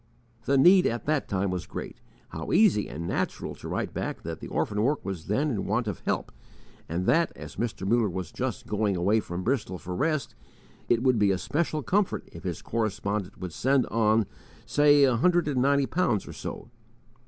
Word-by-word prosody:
The 140 - +3
need 180 +7 +7
at 120 0 -3
that 150 -1 0
time 100 -1 0
was 90 -3 -4
great. - - -7 0.3
How 80 - -5
easy 180 - +4
and 85 +3 -5
natural - - -2
to - - -10
write - - -3
back - - -4
that - - -5
the - - -7
orphan 105 0 -1
work 140 +2 0
was 95 -5 -5
then 140 +9 +1
in 100 -5 -2
want 110 +3 0
of 105 - -3
help, - - -1 0.6
and 85 +3 -2
that, 165 - +3
as - - -10
Mr. 110 -5 -3
Muller 115 0 +3
was 90 -2 -5
just - - -3
going 105 -2 0
away 100 +5 +2
from 90 -3 -5
Bristol 110 -7 -1
for 90 +2 -6
rest, 155 - 0 0.6
it 120 0 +3
would 130 -4 +3
be 105 -1 +4
a 95 - +2
special 155 - -1
comfort 200 +5 0
if - - -11
his - - -4
correspondent 105 -3 -2
would 90 -3 -6
send 135 - +2
on, 110 -1 +3 0.4
say 145 -1 +5
a 130 -3 +4
hundred 175 +4 +3
and 135 -4 +1
ninety 140 +1 +3
pounds 130 - 0
or - - -7
so! 115 - -7
115 Hz, 200 wpm, -27 LUFS, 95-140 Hz, 0.6 s, need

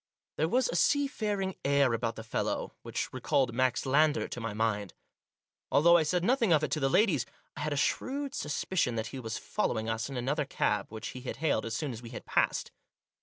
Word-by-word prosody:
There 160 +2 +1
was 255 +5 +3
a - - -3
seafaring 210 - +1
air 140 -3 +3
about 115 0 -1
the 110 - -7
fellow 115 - -2
which - - -4
recalled 130 -4 +1
Max 130 +1 +1
Lander 150 +3 +3
to 120 - -5
my 115 -1 -3
mind. 105 -2 -1 0.8
Although 170 +4 +6
I 170 - +6
said 175 +3 0
nothing 235 -2 +3
of 155 -2 +4
it 155 - -1
to 155 - 0
the 135 -1 +2
ladies, 155 - +3 0.3
I - - -8
had 150 +1 -1
a 145 - -1
shrewd 275 - -1
sus 150 - -3
picion 155 -10 +1
that 110 0 -2
he 135 - -4
was 115 -2 -4
following 115 - -1
us 115 +3 -2
in 135 - -5
another 140 +4 0
cab, 105 -5 0
which 110 0 -6
he 125 - -8
had 125 - -5
hailed 150 -8 0
as 115 - -3
soon 145 +3 -2
as 115 -1 -7
we 120 - -9
had 120 - -8
passed. - - +1
140 Hz, 220 wpm, -30 LUFS, 115-170 Hz, 0.8 s, Although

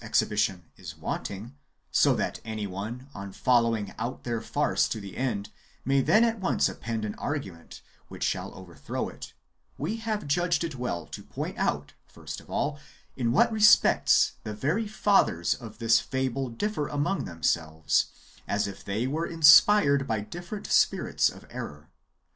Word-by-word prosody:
exhibition 95 -4 +1
is - - -9
wanting, 105 +6 -5 0.4
so - - +4
that - - -2
any 110 -1 -4
one, 105 +7 -6
on 100 0 -7
following 115 -3 +1
out 120 +3 -4
their 115 -2 -2
farce - - +1
to 110 - -3
the 100 -2 -9
end, 115 -6 -2 0.3
may 135 +1 +3
then 215 - +4
at 230 -1 +1
once 190 - +2
append 115 -2 -4
an 105 - -3
argument 100 - -5 0.2
which - - -7
shall - - -1
overthrow 85 -6 -5
it, - - -10 0.4
we 185 +11 -2
have 220 -4 -3
judged 170 +4 +1
it 165 -2 -3
well 125 -9 -3
to - - -9
point - - -6
out, 70 0 -1
first - - -8
of - - -20
all, 145 0 -1 0.4
in 120 -3 0
what 140 - +4
respects 215 -1 +5
the 105 - -5
very 160 - 0
fathers 200 - +2
of 110 -3 -10
this 115 0 +4
fable 130 0 -2
differ 150 - -2
among 145 +7 -1
themselves, 80 -3 0 0.4
as 105 - 0
if 100 - -9
they 105 +5 -2
v/ere 155 +6 -1
inspired 150 -2 +6
by 110 -2 0
different 175 - -7
spirits - - +2
of - - -13
error. 75 +1 -8
120 Hz, 160 wpm, -27 LUFS, 100-150 Hz, 0.4 s, inspired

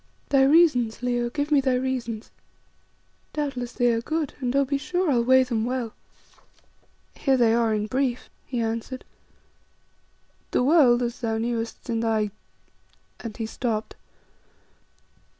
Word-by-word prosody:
"Thy 275 -1 +4
reasons, 270 -7 +3
Leo, 240 -1 0
give 290 +4 -3
me 290 -2 +5
thy 260 -1 +1
reasons. 250 -4 -3 1.0
Doubtless 265 -5 -3
they 245 -2 +2
are 230 - 0
good, 310 +3 -2
and, 255 -1 -2
oh! 280 0 +4
be 280 +1 -1
sure 360 +2 0
I'll 240 -3 +3
weigh 260 +2 +5
them 235 -3 -1
well." 245 -2 -2 1.2
"Here 270 -2 +1
they 235 -2 +4
are 230 -1 +2
in 210 -1 0
brief," 255 +2 -1 0.2
he 245 - -3
answered. 230 +3 -4 1.4
"The - - +1
world, 255 -5 +5
as 240 0 -3
thou 225 -2 -1
knewest 230 +1 -3
in 230 -2 -1
thy 220 -2 0 0.4
" - - -38
and 225 -3 -6
he 225 - -3
stopped. 220 -1 -3
245 Hz, 145 wpm, -25 LUFS, 230-270 Hz, 1.4 s, me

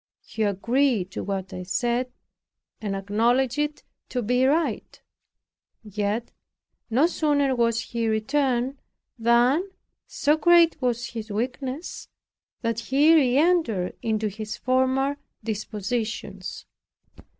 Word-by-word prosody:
He 220 - -6
agreed 215 0 +1
to - - -5
what 195 -1 -4
I 180 - -5
said, 240 +7 -1 0.7
and 205 -2 -2
acknowledged 235 +7 +1
it 295 0 -2 0.3
to 250 -2 -2
be 250 +4 +2
right; 320 +4 0 0.8
yet 210 +2 -2 0.6
no 255 +7 +4
sooner 290 -5 +1
was 230 -1 +1
he 230 -1 -3
returned, 255 +3 0 0.4
than, 245 - +3 0.4
so 300 +2 +1
great 340 0 +5
was 240 -1 -1
his 225 -2 -7
weakness 255 - -4 0.6
that 230 -1 0
he 275 +7 +4
re 265 -5 +4
entered 295 - +2
into 220 -2 0
his 210 +1 -6
former 260 +2 +1 0.3
dispositions. 215 +1 -4
240 Hz, 110 wpm, -25 LUFS, 220-275 Hz, 0.8 s, great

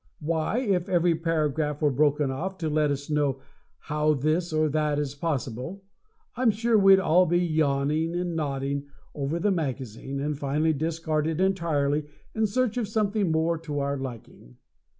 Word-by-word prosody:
Why, 160 +6 -1
if 195 -6 0
every 175 -1 +3
paragraph 155 -3 -1
were 150 -2 +2
broken 145 0 +2
off 185 +8 -4
to 160 -4 -2
let 150 0 +2
us 140 0 -3
know 145 -3 0 0.4
how 150 0 +1
this 155 +5 0
or 155 0 +2
that 150 0 0
is 145 -2 -2
possible, 145 - -4 0.5
I'm 245 -1 +3
sure 225 +2 +1
we'd 195 -2 +7
all 180 0 +4
be 175 +2 +2
yawning 155 -1 +1
and 175 -1 -2
nodding 140 -2 -2 0.3
over 145 +3 -2
the 205 +4 +1
magazine, 135 - -3
and 150 +2 -1
finally 150 +3 0
discard 155 0 -1
it 160 0 -2
entirely 155 -6 +1 0.3
in 220 0 +1
search 245 +2 0
of 235 -4 -1
something 210 -3 0
more 160 +1 +1
to 150 -3 -5
our 140 0 0
liking! 120 - -9
155 Hz, 165 wpm, -26 LUFS, 145-175 Hz, 0.5 s, we'd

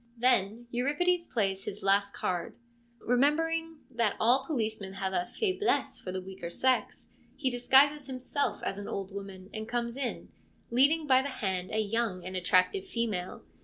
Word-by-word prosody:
Then 235 -2 +2
Euripides 335 +8 +1
plays 195 -4 -1
his 205 - -6
last 200 +1 +2
card. 175 -1 -3 0.4
Remembering 325 +5 +1
that 230 -4 +1
all 245 +4 +4
policemen 220 - -2
have 190 -1 -3
a 180 -1 0
faiblesse 415 0 0
for 185 - -6
the 185 0 -4
weaker 190 -2 -7
sex, 255 +8 0 0.3
he 265 -3 0
disguises 270 +3 +4
him 255 -1 -5
self 285 +3 -2
as 195 - -2
an 205 - -6
old 195 -1 -5
woman, 195 -1 -8
and 220 0 -5
comes 235 -1 -2
in, 260 -4 -3 0.4
leading 290 +6 +4
by 260 -2 +5
the 280 - -3
hand 190 -7 -2
a 215 - -2
young 215 -4 -1
and 185 0 -5
attractive 185 - +2
female. 215 - -3
235 Hz, 165 wpm, -30 LUFS, 195-270 Hz, 0.4 s, by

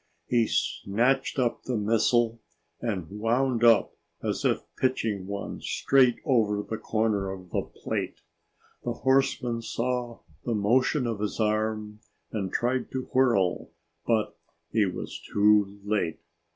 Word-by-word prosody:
He 120 -2 +2
snatched 125 +9 0
up 125 -3 0
the 125 -3 -1
missile 115 +2 +2 0.4
and 100 -8 -2
wound 120 +2 +1
up 115 -2 +5 0.3
as - - -2
if - - +1
pitching 110 -7 -1
one 100 0 -5
straight 130 -3 +3
over 105 -7 +2
the 110 - -4
corner 110 -3 0
of 95 -2 -8
the - - +1
plate. - - -5 0.6
The 120 - -1
horseman 130 -2 +1
saw 120 0 -3 0.2
the 120 - -1
motion 125 +6 +2
of 115 -3 -2
his 105 +2 -3
arm 110 0 -1 0.3
and 95 -4 -3
tried 125 +2 0
to 130 -1 -4
whirl, 115 -9 +2 0.3
but 110 -2 +1 0.4
he 110 -3 +3
was 90 - -5
too 105 -1 +3
late. 100 -6 -1
115 Hz, 130 wpm, -27 LUFS, 105-125 Hz, 0.6 s, up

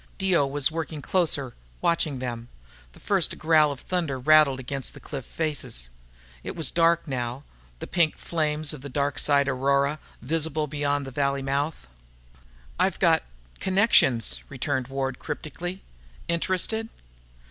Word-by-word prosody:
Dio 185 -7 +2
was 145 +1 +1
working 160 -1 -4
closer, 145 -6 0 0.3
watching 160 -4 +1
them. 120 -2 -5 0.4
The - - -16
first - - +1
growl 155 -2 +4
of 140 - -6
thunder 165 -6 -2
rattled 145 0 +5
against 135 +1 -4
the - - -10
cliff 130 - -7
faces. 135 - -3 0.5
It - - -5
was 165 -4 +1
dark 170 0 +3
now, 125 0 -3 0.3
the - - -6
pink 170 -4 +1
flames 155 -2 -1
of 150 - -9
the 140 - -7
Dark 140 +1 -1
side 140 -1 +3
aurora 140 +2 +1 0.2
visible 155 +3 0
beyond 145 -1 -1
the 135 - -7
valley 140 0 0
mouth. 140 +3 -1 0.9
"I've - - +2
got - - +4 0.4
connections," 190 - +4
returned 130 -1 -2
Ward 135 -1 -3
cryptically. 170 +5 -6 0.4
"Interested?" 185 +6 0
145 Hz, 135 wpm, -26 LUFS, 135-160 Hz, 0.9 s, rattled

